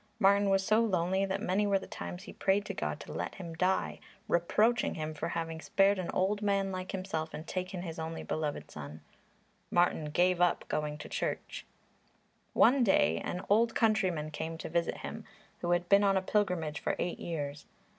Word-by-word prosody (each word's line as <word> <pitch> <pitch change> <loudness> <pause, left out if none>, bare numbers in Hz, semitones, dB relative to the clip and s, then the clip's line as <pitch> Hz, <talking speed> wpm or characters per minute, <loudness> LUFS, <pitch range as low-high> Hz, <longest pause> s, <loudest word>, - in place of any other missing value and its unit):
Martin 200 -1 +4
was 195 0 +2
so 215 +1 +4
lonely 190 -3 +1
that 195 +2 -2
many 205 +1 +1
were 200 -1 +3
the 190 - -7
times 180 +2 -7
he - - -10
prayed 200 +1 +1
to 200 - -4
God 75 - -3
to - - -8
let - - -4
him 170 -3 -7
die, 185 +3 0 0.3
reproaching 215 +6 +2
Him 155 -1 -3
for 145 - -3
having 165 -1 -3
spared 195 +2 +3
an 180 - -3
old 200 +3 0
man 200 -1 +1
like 185 0 -4
himself 185 -5 -3
and 155 - -7
taken 185 0 -4
his 165 -2 -6
only 160 0 -4
beloved 150 -2 -3
son. 75 +1 -8 0.7
Martin 175 -3 +2
gave 175 +4 +2
up 175 -1 +2
going 150 -1 -2
to - - -8
church. - - -4 0.9
One 255 +2 +5
day 195 - +3
an 180 - -4
old 225 +3 +3
countryman 185 -9 +1
came 160 +2 -4
to - - -6
visit 170 0 0
him, - - -6 0.4
who 175 - -3
had 175 0 +2
been 200 +2 +6
on 195 -1 +4
a - - +2
pilgrimage 180 -7 0
for - - -1
eight 175 - -2
years. 145 -3 -4
185 Hz, 190 wpm, -31 LUFS, 165-200 Hz, 0.9 s, been